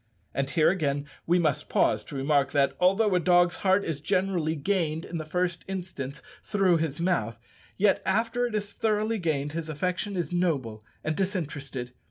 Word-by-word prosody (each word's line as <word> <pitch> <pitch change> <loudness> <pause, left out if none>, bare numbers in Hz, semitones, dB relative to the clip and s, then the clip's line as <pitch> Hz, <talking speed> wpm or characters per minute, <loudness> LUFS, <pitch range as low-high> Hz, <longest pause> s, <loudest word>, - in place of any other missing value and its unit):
And 135 +1 -1
here 155 +2 +4
again 145 -6 -1 0.2
we 175 +2 +4
must 155 -6 0
pause - - +2
to - - -9
remark 140 0 +1
that, 140 -1 +2
although 195 +3 +3
a 180 - +4
dog's 175 0 +4
heart 190 +1 +2
is 150 -4 -3
generally 180 -2 0
gained 160 -1 -1
in 170 - -5
the 155 - -5
first 180 +2 -1
instance 170 -7 -5 0.2
through 195 -5 +3
his 160 -2 -2
mouth, 120 -11 0 0.4
yet, 200 0 +3
after 230 +5 +1
it 225 - -5
is 205 -1 -3
thoroughly 215 0 0
gained, 150 -4 -1
his 160 0 -4
affection 180 +5 -2
is 175 -1 -2
noble 135 -12 -1 0.2
and 155 - -1
disinterested. 145 -10 -3
170 Hz, 175 wpm, -27 LUFS, 145-190 Hz, 0.4 s, here